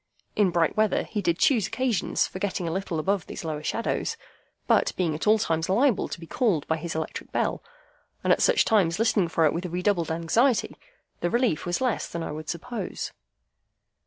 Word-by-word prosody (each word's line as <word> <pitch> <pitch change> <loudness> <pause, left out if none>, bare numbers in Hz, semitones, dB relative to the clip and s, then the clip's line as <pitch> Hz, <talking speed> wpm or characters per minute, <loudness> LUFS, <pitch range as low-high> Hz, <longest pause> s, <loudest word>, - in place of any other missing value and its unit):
In 205 -3 +4
bright 170 -2 +1
weather, 215 0 +2
he 210 - -3
did 170 -3 +1
choose 235 -10 +3
occasions 240 -3 0
for 185 - -7
getting 190 -3 -2
a - - -1
little 185 -1 -2
above 190 +3 0
these - - -7
lower 155 -2 -3
shadows; 230 - -2 0.5
but, - - +3
being 170 -4 +1
at 155 +7 -4
all 215 +1 +6
times 165 -4 -1
liable 235 +4 +3
to - - -6
be 165 - -9
called 185 - 0
by 160 - +1
his 165 0 -5
electric 160 -1 -5
bell, - - -1 0.6
and - - +5
at - - 0
such - - +4
times 190 -6 +3
listening 220 -4 +2
for 165 -1 +2
it 150 - +3
with 175 +2 -3
redoubled 180 0 0
anxiety, 170 +10 +1 0.4
the 175 - 0
relief 235 -7 +1
was 175 +5 -1
less 250 -3 0
than 170 -1 -5
I - - -4
would 155 0 -7
suppose. 240 +7 -4
180 Hz, 195 wpm, -26 LUFS, 165-220 Hz, 0.6 s, all